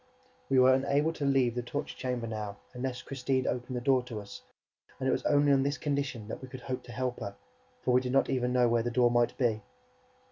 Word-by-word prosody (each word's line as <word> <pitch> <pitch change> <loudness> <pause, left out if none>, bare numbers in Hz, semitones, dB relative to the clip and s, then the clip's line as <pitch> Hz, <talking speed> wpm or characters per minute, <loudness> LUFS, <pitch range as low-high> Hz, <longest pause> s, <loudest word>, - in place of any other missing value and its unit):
We 135 - +3
were 130 0 +7
unable 140 +4 +2
to 145 - -3
leave 135 -3 +3
the 125 - -2
torture 120 - -4
chamber 125 -2 -3
now, 105 -2 -5 0.2
unless 125 0 -4
Christine 130 -1 -1
opened 125 0 -2
the - - -3
door 130 0 +3
to 115 -4 -5
us; 100 -1 -10 0.6
and 130 - -1
it - - +3
was - - +1
only 145 0 +4
on 135 -1 +4
this 140 +1 0
condition 140 -7 -2
that - - -6
we 130 - -8
could 130 0 -9
hope 130 +1 -4
to 120 - -10
help 125 +1 -2
her, 100 - -5 0.5
for 125 - +2
we 125 +1 +5
did 125 -1 -3
not 135 - +3
even 125 -2 0
know 125 -1 +4
where 115 0 +2
the 120 - -1
door 120 0 +3
might 120 0 +2
be. 115 -4 +1
125 Hz, 240 wpm, -30 LUFS, 120-135 Hz, 0.6 s, were